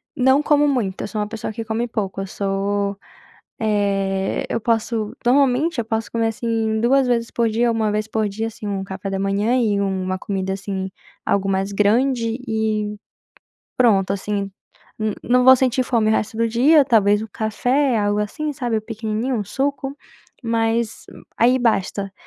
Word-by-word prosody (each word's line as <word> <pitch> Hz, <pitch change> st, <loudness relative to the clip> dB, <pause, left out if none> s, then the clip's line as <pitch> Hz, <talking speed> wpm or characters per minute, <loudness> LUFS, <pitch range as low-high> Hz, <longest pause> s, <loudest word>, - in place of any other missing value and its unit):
não 265 Hz, +2 st, +3 dB
como 295 Hz, -1 st, +3 dB
muito. 215 Hz, -9 st, -1 dB
Eu -, -, -3 dB
sou 210 Hz, +1 st, -3 dB
uma 210 Hz, -, -2 dB
pessoa 215 Hz, 0 st, -5 dB
que 225 Hz, -, -5 dB
come 225 Hz, +2 st, -2 dB
pouco 200 Hz, -4 st, -3 dB
eu 195 Hz, -, -5 dB
sou, 200 Hz, +1 st, -1 dB, 0.6 s
eh, 195 Hz, -3 st, 0 dB
eu 230 Hz, -, -1 dB
posso 225 Hz, -1 st, -1 dB
normalmente 270 Hz, +4 st, +3 dB
eu 235 Hz, -, 0 dB
posso 225 Hz, 0 st, -3 dB
comer, 230 Hz, -1 st, 0 dB
assim, 225 Hz, -1 st, -1 dB
2 260 Hz, +3 st, +3 dB
vezes 235 Hz, -1 st, 0 dB
por 235 Hz, -1 st, +1 dB
dia, 235 Hz, +2 st, +1 dB
1 220 Hz, -2 st, 0 dB
vez 215 Hz, +1 st, -2 dB
por 220 Hz, -1 st, 0 dB
dia, 220 Hz, +3 st, -3 dB
assim, 215 Hz, -1 st, -9 dB
um 200 Hz, -1 st, -2 dB
café 195 Hz, 0 st, -6 dB
da 195 Hz, 0 st, -2 dB
manhã 205 Hz, +5 st, +1 dB
e 210 Hz, -5 st, +1 dB
uma 185 Hz, -1 st, -1 dB
comida 190 Hz, -1 st, -3 dB
assim 190 Hz, -1 st, -4 dB, 0.3 s
algo 195 Hz, 0 st, +1 dB
mais 195 Hz, +1 st, 0 dB
grande 230 Hz, +3 st, +1 dB
e 215 Hz, -1 st, -1 dB, 0.8 s
pronto, 200 Hz, -6 st, +3 dB
assim 200 Hz, 0 st, -3 dB, 0.5 s
n 215 Hz, -1 st, -1 dB
não 250 Hz, +1 st, +3 dB
vou 260 Hz, +1 st, +9 dB
sentir 255 Hz, 0 st, +1 dB
fome 230 Hz, -4 st, +1 dB
o -, -, +4 dB
resto 220 Hz, 0 st, -1 dB
do 230 Hz, -, +2 dB
dia 275 Hz, +7 st, +5 dB
talvez 210 Hz, -3 st, +3 dB
o 220 Hz, -, -5 dB
café, 245 Hz, +4 st, +1 dB
algo 205 Hz, 0 st, +1 dB
assim, 300 Hz, +9 st, -2 dB
sabe 240 Hz, -5 st, -1 dB
pequenininho, 220 Hz, +3 st, -3 dB
um 210 Hz, -, -1 dB
suco, 275 Hz, +4 st, -2 dB, 0.5 s
mas 230 Hz, 0 st, 0 dB, 0.3 s
aí 250 Hz, +3 st, +4 dB
basta. 200 Hz, -4 st, 0 dB
220 Hz, 175 wpm, -21 LUFS, 200-240 Hz, 0.8 s, vou